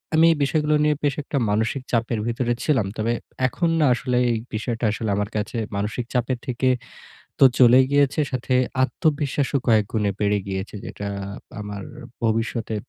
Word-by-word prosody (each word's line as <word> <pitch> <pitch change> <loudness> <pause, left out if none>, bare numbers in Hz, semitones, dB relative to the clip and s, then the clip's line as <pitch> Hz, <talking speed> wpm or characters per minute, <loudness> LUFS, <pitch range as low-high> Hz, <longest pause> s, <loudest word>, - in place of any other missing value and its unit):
আমি 160 +1 +6
এই - - -5
বিষয়গুলো 150 +1 +1
নিয়ে 150 0 +3
বেশ 145 -2 +1
একটা 140 - -3
মানসিক 110 +6 0
চাপের 115 -1 0
ভিতরে 120 0 0
ছিলাম। 125 -10 +2
তবে 115 +2 0 0.3
এখন 170 +6 -1
না 150 - +4
আসলে 125 0 -1
এই 115 - +1 0.2
বিষয়টা 115 +2 -2
আসলে 110 0 -3
আমার 105 0 -1
কাছে 105 +3 -3 0.2
মানসিক 105 +4 -2
চাপের 125 0 0
থেকে 130 +1 +1 0.7
তো - - +7
চলে 125 0 +7
গিয়েছে। 145 +1 +3
সাথে 130 0 -1 0.3
আত্মবিশ্বাসও 145 -1 0
কয়েকগুণে 105 -2 +2
বেড়ে 105 0 +2
গিয়েছে। 95 +2 -4
যেটা 100 - -6 0.5
আমার 100 -1 -6 0.4
ভবিষ্যতে 115 0 -1
120 Hz, 155 wpm, -23 LUFS, 110-140 Hz, 0.7 s, তো